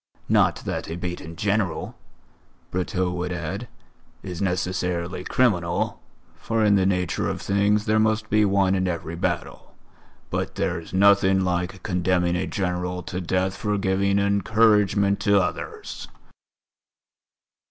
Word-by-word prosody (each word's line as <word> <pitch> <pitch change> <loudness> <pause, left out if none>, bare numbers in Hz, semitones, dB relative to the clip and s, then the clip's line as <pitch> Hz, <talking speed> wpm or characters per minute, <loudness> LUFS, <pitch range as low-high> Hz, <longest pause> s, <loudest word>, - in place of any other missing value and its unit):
Not - - +3
that - - -3
a 80 - -4
beaten 85 -1 -5
General," 100 -4 -1 0.8
Brotteaux 90 0 -1
would 90 0 -3
add, 90 +7 -4 0.6
"is 90 -1 -6
necessarily 90 -2 -1
criminal, 90 -9 0 0.4
for 115 -1 0
in 105 - +5
the 95 -2 +3
nature 90 -2 0
of - - -3
things 100 +2 +1
there 110 0 +2
must 110 0 +1
be 105 +1 +3
one 100 -2 +3
in 95 -1 +1
every 85 -1 -3
battle. 85 - -4 0.6
But - - -2
there's 85 - -2
nothing 95 0 +4
like 90 0 -2
condemning 90 -1 +1
a 90 - -1
General 90 -1 -2
to 90 - -4
death 95 +2 0
for 105 -1 -1
giving 100 0 +1
encouragement 100 0 +3
to 100 -1 +4
others." 90 -1 -4
95 Hz, 130 wpm, -24 LUFS, 90-100 Hz, 0.8 s, in